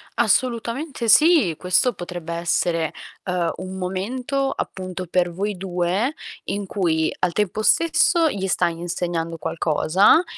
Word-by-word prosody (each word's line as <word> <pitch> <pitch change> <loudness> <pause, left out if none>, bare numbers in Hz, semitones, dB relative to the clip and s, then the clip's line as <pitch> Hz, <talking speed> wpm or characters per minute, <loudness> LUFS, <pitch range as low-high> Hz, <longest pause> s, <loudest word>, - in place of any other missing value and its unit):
Assolutamente 245 +1 0
sì, 300 - +5
questo 185 +7 +2
potrebbe 175 -2 -6
essere, 170 -1 0 0.3
ehm, 180 -2 -1
un 185 0 -7
momento 245 +9 -2
appunto 185 -1 -5
per 175 0 +1
voi 200 +4 -3
2, 185 - -1 0.3
in 200 0 -3
cui 165 -5 0
al 180 -1 +1
tempo 210 +1 -1
stesso 335 +4 +3
gli 195 -5 -3
stai 170 -2 0
insegnando 170 -1 -3
qualcosa 170 - +3
185 Hz, 120 wpm, -22 LUFS, 175-235 Hz, 0.3 s, sì